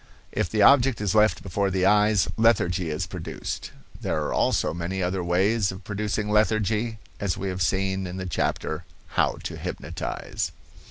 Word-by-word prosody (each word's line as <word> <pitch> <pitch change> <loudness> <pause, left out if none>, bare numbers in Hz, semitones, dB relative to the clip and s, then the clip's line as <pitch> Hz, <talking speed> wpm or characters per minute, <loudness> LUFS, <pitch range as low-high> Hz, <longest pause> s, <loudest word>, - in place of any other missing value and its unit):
If - - -1
the 105 -2 +2
object 135 +1 +6
is 105 -3 0
left 110 0 +3
before 100 +1 0
the 95 0 +1
eyes, 105 0 +4
lethargy 90 -7 +2
is 75 - -2
produced. - - -5 0.3
There 75 - -1
are - - -2
also - - +2
many 90 +3 -3
other 90 0 -1
ways 95 +4 +2
of 95 +1 -10
producing 105 +1 -2
lethargy, 110 +1 +1 0.2
as 100 -3 -1
we 95 0 -3
have 95 0 -4
seen 95 +2 0
in 90 +1 -6
the 95 - -4
chapter 80 -1 -2 0.3
"How - - +1
to - - -5
Hypnotize." - - -4
95 Hz, 165 wpm, -25 LUFS, 90-105 Hz, 0.3 s, object